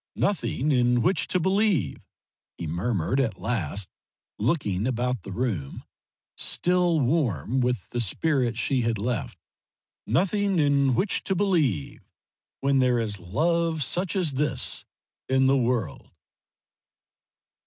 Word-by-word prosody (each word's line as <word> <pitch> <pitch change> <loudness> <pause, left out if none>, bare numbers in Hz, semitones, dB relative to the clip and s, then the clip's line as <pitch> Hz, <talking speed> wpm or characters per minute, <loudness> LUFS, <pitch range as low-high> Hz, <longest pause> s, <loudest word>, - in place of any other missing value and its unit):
"Nothing 155 -7 0
in 125 -2 +3
which 185 +3 +2
to 185 - +1
believe," 190 - +1 0.6
he 85 - -5
murmured 95 - -1
at 120 -5 -1
last, 100 -4 -2 0.5
looking 105 - 0
about 125 -2 -1
the 95 - -9
room 95 - -3 0.5
still 180 -2 +1
warm 130 - 0
with 125 -5 -1
the 120 - -1
spirit 120 - 0
she 130 +1 +1
had 115 -1 0
left 105 - -3 0.7
"nothing 195 - +1
in 140 -4 +3
which 195 - 0
to 190 - 0
believe 160 - 0 0.6
when 140 0 +2
there 125 -1 +3
is 105 -3 -2
love 160 - 0
such 180 - -1
as 180 -6 +1
this 145 +3 -1 0.4
in 130 0 +3
the 135 +1 +4
world?" 120 - -1
130 Hz, 120 wpm, -26 LUFS, 110-165 Hz, 0.7 s, the